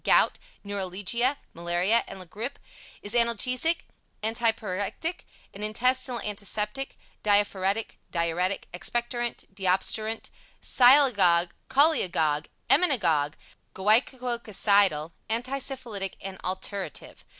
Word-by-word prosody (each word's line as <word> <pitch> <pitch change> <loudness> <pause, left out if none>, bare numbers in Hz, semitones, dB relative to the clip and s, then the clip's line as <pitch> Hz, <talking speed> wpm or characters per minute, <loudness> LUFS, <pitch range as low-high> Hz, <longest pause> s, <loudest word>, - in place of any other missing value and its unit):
Gout, - - +4 0.2
Neuralgia, 205 +6 -1 0.2
Malaria 175 +7 +1
and 195 - -8
La 185 - -7
Grippe; 225 +10 -6 0.5
is 205 - -3
analgesic, 245 +7 +2 0.4
antipyrectic, 225 - -1 0.3
an 200 - -9
intestinal 250 +3 +1
antiseptic, 210 +5 -3 0.3
diaphoretic, 205 0 +1
diuretic, 175 +3 -1
expectorant, 240 +5 -2
deobstruent, 205 +4 0 0.3
sialagogue, 205 -10 +5 0.2
cholagogue, 175 - +3 0.2
emmenagogue, 180 - +3 0.4
gouocococidal, 210 - +2 0.2
anti 250 +5 -1
syphilitic 235 -8 -4
and 190 -1 -7
alterative. 190 +1 -5
210 Hz, 85 wpm, -27 LUFS, 185-245 Hz, 0.5 s, sialagogue